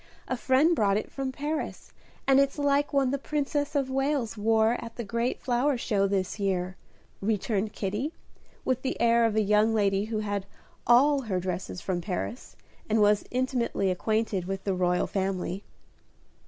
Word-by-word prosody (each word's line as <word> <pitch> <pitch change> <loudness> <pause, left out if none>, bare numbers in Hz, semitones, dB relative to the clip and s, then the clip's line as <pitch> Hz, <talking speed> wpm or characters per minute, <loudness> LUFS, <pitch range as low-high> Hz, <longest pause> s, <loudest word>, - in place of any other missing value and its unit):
A 255 - -1
friend 270 +7 +3
brought 200 -6 +2
it - - -4
from 270 -1 -3
Paris, 295 +3 -4 0.3
and 270 0 +5
it's 275 +1 +2
like 285 0 +2
one 275 -3 +2
the 280 - -1
Princess 290 +1 -2
of 270 -2 0
Wales 270 -4 0
wore 220 +2 +2
at 230 -1 -9
the 240 - -4
great 235 +3 -1
flower 255 +2 +1
show 205 -4 +1
this 195 +1 -1
year," 185 -2 -1 0.5
returned 210 0 0
Kitty, 210 +10 -2 0.5
with 255 -1 0
the 265 - -3
air 235 0 +4
of 220 -2 +1
a 220 - +3
young 210 +2 +3
lady 200 -1 +2
who 220 0 -3
had 205 -2 -3 0.4
all 275 +4 +5
her 200 -7 -2
dresses 180 0 -4
from 180 -2 -2
Paris, 200 +6 -5 0.3
and 220 +1 +3
was 210 0 +4
intimately 245 -6 0
acquainted 215 0 -1
with 195 +1 -4
the 195 - 0
royal 180 -1 +1
family. 190 0 -2
225 Hz, 170 wpm, -28 LUFS, 195-265 Hz, 0.5 s, and